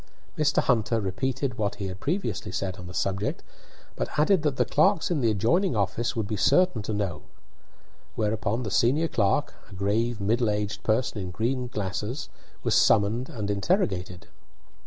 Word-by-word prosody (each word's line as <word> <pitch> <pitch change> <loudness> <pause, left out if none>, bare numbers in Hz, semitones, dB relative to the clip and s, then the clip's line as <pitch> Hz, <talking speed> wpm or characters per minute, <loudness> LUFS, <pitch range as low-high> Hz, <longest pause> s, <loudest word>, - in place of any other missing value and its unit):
Mr. 150 -1 +2
Hunter 115 -2 +2
repeated 120 +6 -2
what 100 -2 0
he 100 - -5
had 95 0 -6
previously 170 - -2
said 95 0 -3
on 90 - -8
the 90 - -9
subject, 100 +1 -1 0.5
but - - -2
added 165 +4 +4
that 150 -3 0
the - - +3
clerks 190 -3 +2
in 155 -5 +1
the 115 - +3
adjoining 120 - +2
office 105 +3 0
would 110 -3 -1
be 105 - -2
certain 140 - +3
to 105 - -4
know. 100 -7 -2 0.9
Whereupon 110 +2 -1
the 105 - -4
senior 140 +11 +3
clerk, 100 -9 +1 0.2
a - - -11
grave, 110 +4 0
middle 110 +3 +1
aged 105 0 -2
person 110 0 0
in 90 - -4
green 125 +7 -1
glasses, 105 +5 -4 0.3
was - - +1
summoned 110 +5 +3
and 105 -3 -3
interrogated. 100 - -1
110 Hz, 165 wpm, -26 LUFS, 100-130 Hz, 0.9 s, added